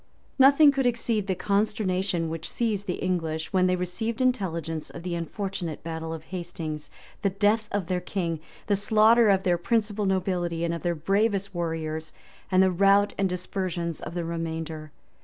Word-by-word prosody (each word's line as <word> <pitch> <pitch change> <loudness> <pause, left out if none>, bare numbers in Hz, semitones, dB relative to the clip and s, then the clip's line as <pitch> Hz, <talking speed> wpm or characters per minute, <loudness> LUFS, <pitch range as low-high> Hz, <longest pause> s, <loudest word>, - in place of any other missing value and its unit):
} - - -37
Nothing 280 +2 +8
could 270 -2 +1
exceed 230 -4 0
the 190 - 0
consternation 195 -3 0
which 165 0 -5
seized 210 -4 -1
the 180 - -1
English 165 -3 -2
when 185 -1 +4
they 180 - +2
received 200 +7 -3
intelligence 170 -11 -1
of 170 - -9
the 180 -1 -3
unfortunate 170 -1 -4
battle 160 0 -4
of 160 -1 -6
Hastings, 165 -4 -5 0.3
the 200 - +2
death 210 +3 +1
of 200 -3 -1
their 180 +1 -1
king, 170 -3 -2 0.3
the 205 - +2
slaughter 220 +3 +5
of 190 -1 +3
their 175 -2 +2
principal 210 0 0
nobility 180 -3 0
and 170 0 0
of 170 - -4
their 175 -1 0
bravest 200 +4 0
warriors, 160 -2 -3 0.4
and 185 0 +5
the 190 - +3
rout 200 +3 +4
and 195 -1 +2
dispersion 180 -2 -3
of 160 - -7
the 175 -1 -2
remainder. 160 -2 -4
185 Hz, 175 wpm, -26 LUFS, 165-205 Hz, 0.4 s, Nothing